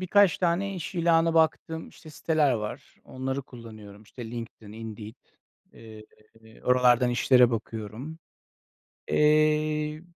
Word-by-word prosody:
birkaç 185 -1 +3
tane 185 +3 0
iş 180 +1 -7
ilanı 165 -1 +2
baktığım, 160 0 0
işte, 155 - -15
siteler 150 -2 +1
var. 105 -3 -6
Onları 130 +1 -4
kullanıyorum, 110 -5 -13
işte, 115 +1 -10
LinkedIn, 115 -3 -9
Indeed. 110 -1 -9 0.6
Eee, 110 -1 -13 0.6
oralardan 125 -1 +3
işlere 125 0 +4
bakıyorum. 115 +6 -6 0.9
Eee 155 0 +2
130 Hz, 105 wpm, -26 LUFS, 115-160 Hz, 0.9 s, işlere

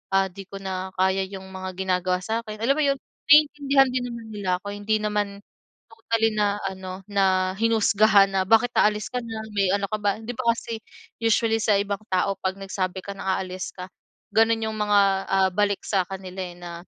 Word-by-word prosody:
ah, 190 -1 +2
'di 195 0 -10
ko 200 - -11
na 190 0 -5
kaya 190 +1 +1
yung 190 -1 -9
mga 190 0 -5
ginagawa 185 -1 0
sa'kin. 220 -1 -4
Alam 275 +5 +2
mo'yon, 280 -2 +2 0.3
naiintindihan 285 -2 +5
din 250 -1 -1
naman 235 -1 -7
nila 205 -3 -4
ako. 205 - -5
Hindi 210 +1 -1
naman 205 -1 -2 0.4
totally 225 0 0
na 205 -1 +1
ano, 190 -1 -6
na 190 -2 +1
hinusgahan 215 -2 +4
na, 190 -1 +1
"Bakit 225 +5 +3
aalis 210 0 +2
ka 250 - -1
na? 225 -1 -6 0.2
May 195 -2 +2
ano 200 0 0
ka 215 - -2
ba?" 205 0 0
'Di 225 +2 -5
ba 255 - -4
kasi 230 -1 -5 0.4
usually 225 0 +2
sa 210 - +3
ibang 200 -1 -2
tao 190 +1 +1
'pag 190 0 0
nagsabi 190 -1 -3
ka 200 0 -7
na 190 -1 -1
aalis 185 -1 -5
ka, 180 0 -7 0.5
gano'n 225 0 +3
yung 220 - -4
mga, 210 -1 +3 0.3
ah, 195 0 +3
balik 205 +1 +1
sa 195 -3 +2
kanila, 190 -1 -8
eh, 175 -1 -8
na, 170 -1 -8
205 Hz, 190 wpm, -24 LUFS, 190-225 Hz, 0.5 s, naiintindihan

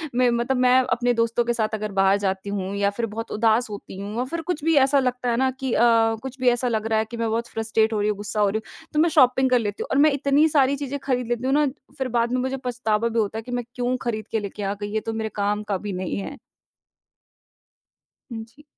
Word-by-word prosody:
में 250 -1 +4
मतलब 240 +2 0
मैं 255 0 +5
अपने 245 0 +2
दोस्तों 230 +1 +1
के 240 - +1
साथ 220 -1 -1
अगर 215 -1 -3
बाहर 195 0 +3
जाती 195 0 -2
हूँ 195 -1 -3
या 200 0 +2
फिर 230 +3 -3
बहुत 225 +2 -6
उदास 225 +2 +2
होती 205 -2 -8
हूँ 205 +2 -6
और 250 - 0
फिर 335 +3 -4
कुछ 320 -2 -3
भी 325 0 +3
ऐसा 275 0 +3
लगता 250 -1 -1
है 235 - +1
ना 265 0 +2
कि 265 -3 -2
अ, - - +2 0.4
कुछ 265 0 -7
भी 250 -1 +4
ऐसा 245 +1 0
लग 220 -2 -1
रहा 220 -1 +2
है 220 - 0
कि 235 - -5
मैं 230 -1 -1
बहुत 230 +1 -1
फ्रस्ट्रेट 225 0 0
हो 210 - 0
रही 210 +1 +1
हूँ, 205 - -1
गुस्सा 205 +1 -4
हो 205 -1 +4
रही 220 +2 -2
हूँ 320 - -16
तो 300 - +1
मैं 335 +1 +4
शॉपिंग 260 -3 +4
कर 250 -1 +4
लेती 205 -2 -3
हूँ - - -9
और - - +2
मैं 310 - +5
इतनी 280 +2 +3
सारी 280 -2 +3
चीज़ें 280 0 -4
खरीद 250 -3 -1
लेती 240 +1 -2
हूँ 265 - +1
ना 295 0 +4 0.3
फिर 265 -1 -1
बाद 235 +1 +1
में 255 - +1
मुझे 260 +1 -2
पछतावा 230 -2 0
भी 230 0 0
होता 215 +1 -1
है - - -3
कि 245 - -9
मैं 245 0 -1
क्यों 250 0 0
खरीद 220 -3 -3
के 220 - +1
लेके 205 0 -6
आ 195 +1 -1
गई 205 0 -4
ये 220 - +1
तो - - -2
मेरे 220 0 -3
काम 205 +1 0
का 200 -2 -2
भी 200 - -3
नहीं 180 0 -3
है। 280 +8 -6 1.9
हुँ, 225 -1 -5
जी। 285 +6 -21
235 Hz, 270 wpm, -23 LUFS, 210-255 Hz, 1.9 s, मैं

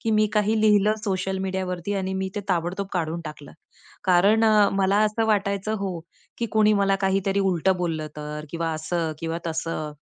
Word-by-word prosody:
की 225 - -1
मी 215 0 +3
काही 215 +1 +2
लिहिलं 210 0 +4
सोशल 190 -1 -1
मीडियावरती 185 0 -3
आणि 190 -1 -2
मी 190 0 -2
ते 205 - -2
ताबडतोब 180 +2 -1
काढून 170 -2 -2
टाकलं, 150 -2 -9 0.5
कारण 195 +5 +4
अ, 210 -2 +5
मला 195 +1 +2
असं 215 +1 0
वाटायचं 200 0 0
हो, 190 -3 -3 0.4
की 235 - -1
कुणी 215 -1 +4
मला 195 -1 +2
काहीतरी 195 0 +1
उलटं 190 -1 +2
बोललं 165 -3 -2
तर 150 0 -6 0.3
असं 160 +1 -2
किंवा 165 0 -3
तसं. 160 -2 -3
190 Hz, 165 wpm, -24 LUFS, 170-205 Hz, 0.5 s, अ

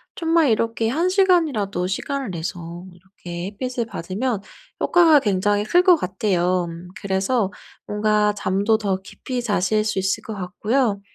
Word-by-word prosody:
정말 330 -3 +2
이렇게 225 0 0
1 325 +10 +1
시간이라도 320 - +2
시간을 265 +5 -3
내서 170 +1 -6
이렇게 175 -1 -8
햇빛을 240 +4 -3
받으면 205 +4 -3 0.4
효과가 330 -4 +5
굉장히 205 -2 +1
클 355 +10 +4
것 365 -2 +6
같아요. 185 - 0 0.3
그래서 195 +2 0 0.3
뭔가 210 0 +1
잠도 200 +2 +1
더 195 -3 -2
깊이 250 +5 -5
자실 215 -1 +1
수 210 -2 -1
있을 190 0 -1
것 220 - -6
같고요. 205 +3 -1
210 Hz, 290 characters per minute, -22 LUFS, 190-255 Hz, 0.4 s, 것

